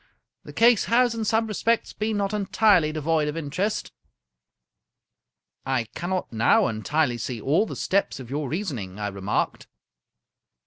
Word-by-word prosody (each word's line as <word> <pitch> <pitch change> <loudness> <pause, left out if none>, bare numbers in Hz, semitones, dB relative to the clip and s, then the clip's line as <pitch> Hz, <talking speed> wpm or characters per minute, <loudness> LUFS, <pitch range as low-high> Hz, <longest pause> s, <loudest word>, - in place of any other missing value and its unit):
The - - -10
case 235 -1 +4
has, 240 0 +3
in 225 -1 -3
some 225 +1 +2
respects, 225 +2 0
been 215 0 -2
not 200 0 -1
entirely 200 -5 +3
devoid 155 0 0
of 150 +2 -3
interest." 165 +8 -2 0.9
" - - -61 0.7
I 130 -3 +1
cannot 180 -5 -3
now 115 +1 +4
entirely 120 +3 0
see 120 +1 -4
all 155 - +1
the - - -6
steps 200 -7 0
of 130 - -8
your 145 -1 -2
reason 160 - -3
ing," 95 -1 -8
I 105 0 -2
remarked. 100 +1 -2
160 Hz, 150 wpm, -25 LUFS, 130-210 Hz, 0.9 s, case